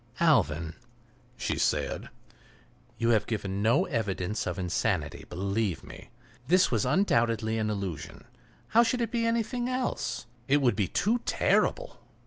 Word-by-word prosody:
"Alvan," 85 - +2 0.6
she 125 - -2
said, - - 0 0.9
"you 115 - +1
have 110 -3 +3
given 100 -3 -2
no 120 - +3
evidence 105 - -2
of 90 - -3
insanity, 90 -2 -1
believe 100 0 -1
me. - - -12 0.4
This 180 +2 +4
was 110 -4 +1
undoubtedly 115 - +2
an 110 -1 0
illusion—how 100 - -3
should 240 +1 +1
it 230 - -1
be 230 -1 +1
anything 235 +2 -1
else? 255 - -2 0.2
That 145 +2 +4
would 125 -6 +2
be 105 -4 0
too 220 - +1
terrible! - - +1
115 Hz, 130 wpm, -28 LUFS, -, 0.9 s, This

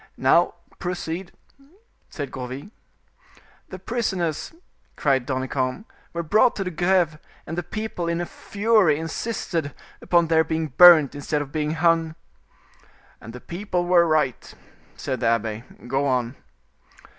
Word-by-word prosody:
"Now, - - +3 0.2
proceed," 175 0 -4 0.8
said 145 -3 -6
Gourville. 130 +9 -7 1.0
"The 185 - -7
prisoners," 190 -7 -2 0.4
cried 135 -4 +1
Danicamp, 130 - -2 0.3
"were 170 0 -3
brought 215 +9 +3
to 195 - -2
the 180 - -4
Greve, 175 -2 +1 0.3
and 165 - -5
the 175 - -1
people, 215 -4 -5
in 170 0 -1
a 175 - -2
fury, 205 -6 +2
insisted 165 -2 -3 0.3
upon 170 -1 +3
their 160 0 +3
being 160 0 -2
burnt 160 -1 +8
instead 145 +1 -2
of 140 - -13
being 155 0 -1
hung." 165 -1 +2 1.1
"And 115 - -9
the 125 - -9
people 180 0 -3
were 175 -1 +4
right," 150 -6 0 0.4
said 130 - -4
the - - 0
abbe. 115 -1 0 0.2
"Go 135 +3 0
on." 125 -1 0
160 Hz, 135 wpm, -23 LUFS, 140-180 Hz, 1.1 s, burnt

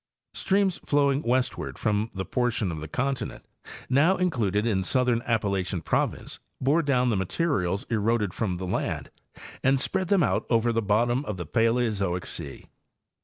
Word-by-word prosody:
Streams 195 -1 +1
flowing 140 -1 +2
westward 125 0 -1
from 105 0 0
the 95 -1 -4
portion 120 -6 0
of 80 -2 -6
the 80 - -6
continent 130 - -3 0.4
now 150 +9 +3
included 115 - 0
in 105 -5 +1
the - - -3
southern 125 -3 +2
Appalachian 100 -6 0
province - - -1 0.2
bore 145 +6 +3
down 130 -5 +2
the 115 - +1
materials 95 - 0
eroded 110 -3 0
from 95 -6 -2
the 95 - -5
land 90 - -3 0.5
and 135 0 +3
spread 190 +6 -1
them 195 -2 +3
out - - 0
over 115 0 +2
the 115 - +1
bottom 120 +5 +1
of 105 -6 -4
the 85 - -5
Paleozoic 110 -4 0
sea. 75 -5 -5
115 Hz, 160 wpm, -26 LUFS, 100-135 Hz, 0.5 s, now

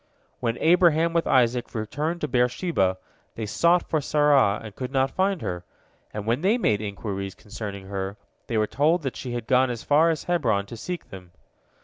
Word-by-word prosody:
When 120 -1 -1
Abraham 170 -1 +4
with 170 -1 +1
Isaac 125 -2 +2
returned 150 +10 -3
to 150 - -1
Beer 125 -3 +2
sheba, 110 - 0 0.4
they 110 - -4
sought 170 - +2
for 155 - 0
Sarah 145 -8 +3
and 105 -3 -9
could 125 -1 -4
not 135 0 +1
find 190 -1 0
her, 90 0 -4 0.5
and 105 -1 -5
when 120 +5 0
they 205 +6 +3
made 110 - +1
inquiries 100 -2 -5
concerning 100 -2 -7
her, 95 +1 -4 0.3
they 115 - -1
were 110 - +3
told 150 +10 +1
that 135 - -3
she 125 -2 -5
had 120 -2 -4
gone 130 +1 +3
as 120 -2 -5
far 155 +3 +4
as 160 -3 -1
Hebron 115 - +1
to 115 - -9
seek 175 +9 -6
them. 90 -2 -11
125 Hz, 195 wpm, -25 LUFS, 105-160 Hz, 0.5 s, Abraham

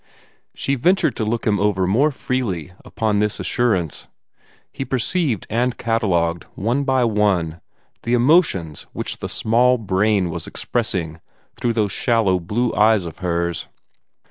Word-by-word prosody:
She 140 - -1
ventured 180 +9 +2
to 110 - -1
look 115 +2 -2
him 105 -3 +2
over 100 -2 +1
more 120 +11 +3
freely, 115 - -3
upon 110 -2 -1
this 105 0 0
assurance. 105 - -1 0.6
He - - -4
perceived 135 - 0
and 120 +3 0
catalogued, 90 -7 0
one 120 +8 0
by 130 -2 +2
one, 100 -7 +1 0.4
the 120 +1 +1
emotions 120 - +2
which - - -4
the - - -5
small 125 +3 +3
brain 100 -3 +1
was 85 -1 -5
expressing 90 -9 -3 0.3
through 120 - -1
those 105 -3 0
shallow 115 -7 +2
blue 115 +8 -1
eyes 105 -3 +3
of 85 - -8
hers. 85 -2 -2
110 Hz, 140 wpm, -21 LUFS, 90-120 Hz, 0.6 s, more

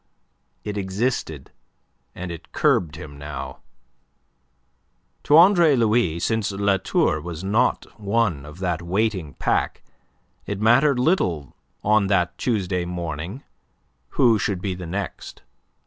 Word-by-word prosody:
But 105 - -3
it 105 - -6
existed, 95 - -2 0.6
and 90 -1 -5
it 85 - -10
curbed 75 -5 +2
him 70 -1 -10
now. 70 -2 -7 1.7
To 150 - +6
Andre 170 -4 +6
Louis, 110 -8 +2
since 110 +3 0
La 100 0 +1
Tour 75 -3 +1
was 85 +1 -6
not 100 +4 +1 0.2
one 100 -8 0
of 75 +2 -11
that 90 -3 -2
waiting 95 -3 -1
pack, - - -1 0.6
it 100 -1 -3
mattered 125 +6 +4
little 90 - 0 0.3
on 105 -1 +3
that 90 -2 +1
Tuesday 95 -7 0
morning 85 - -5 0.7
who 115 -5 +5
should 100 -3 -1
be 95 0 -2
the 90 -1 -7
next. 100 +4 -6
95 Hz, 125 wpm, -23 LUFS, 85-110 Hz, 1.7 s, To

